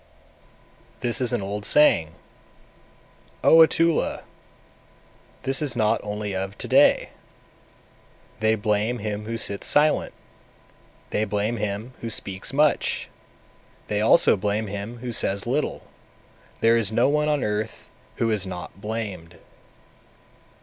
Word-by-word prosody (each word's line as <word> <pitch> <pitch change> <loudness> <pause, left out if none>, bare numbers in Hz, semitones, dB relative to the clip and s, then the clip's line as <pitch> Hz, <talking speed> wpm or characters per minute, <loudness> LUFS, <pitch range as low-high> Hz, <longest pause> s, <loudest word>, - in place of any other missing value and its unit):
227. - - -1
This 120 - -2
is 125 - 0
an 120 -5 -1
old 100 +1 -4
saying, 85 - +3 1.3
O 160 - +7
Atula, 165 0 +3 1.2
this 135 +2 0
is 145 -5 -2
not 110 -1 +2
only 105 -1 -4
of 95 +1 -4
to - - -5
day: - - +4 1.3
`They 110 0 +2
blame 105 +3 0
him 105 -1 -4
who 115 +1 -4
sits 100 -3 -2
silent, 150 +1 +2 1.0
they 105 - 0
blame 105 +2 -1
him 105 +4 -4
who 115 - -4
speaks 100 -2 -2
much, 150 +2 +1 0.8
they 105 0 0
also 110 - +5
blame 105 +2 -1
him 100 +4 -6
who 120 - -3
says 100 -3 +1
little; 135 +6 -2 0.8
there 115 +1 +5
is 110 -3 +1
no 120 +3 +3
one 150 +1 +1
on 150 -3 0
earth 105 +1 -3 0.3
who 115 -1 0
is 100 -3 -1
not 90 +1 -8
blamed.' 100 -6 -5
110 Hz, 130 wpm, -24 LUFS, 100-120 Hz, 1.3 s, O